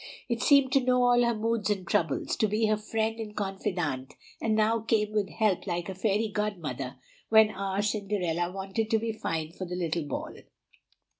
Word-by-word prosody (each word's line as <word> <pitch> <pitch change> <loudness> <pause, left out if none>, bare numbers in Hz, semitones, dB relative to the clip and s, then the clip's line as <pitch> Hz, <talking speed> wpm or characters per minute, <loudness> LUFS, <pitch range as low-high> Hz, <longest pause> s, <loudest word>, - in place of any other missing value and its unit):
It 235 -1 -1
seemed 280 -2 +5
to 275 - +4
know 250 0 +3
all 245 0 +5
her 235 -1 +2
moods 225 0 0
and 195 -4 -1
troubles, 160 -5 0
to 215 - +3
be 215 +2 +1
her 215 0 +3
friend 220 +1 -2
and 210 -2 -6
confidante, 180 -9 -2 0.3
and 220 -1 +1
now 220 +1 +3
came 215 -1 +1
with 210 -2 0
help 210 -4 0
like 175 0 -2
a - - -3
fairy 210 +3 +1
godmother 155 -12 -3 0.3
when 220 -1 +6
our 195 0 -2
Cinderella 195 -5 -1
wanted 195 +3 -3
to 225 - +3
be 225 +1 -2
fine 160 -7 -3
for 185 +2 -6
the 180 0 -5
little 170 -2 -1
ball. - - -4
210 Hz, 190 wpm, -28 LUFS, 180-220 Hz, 0.3 s, when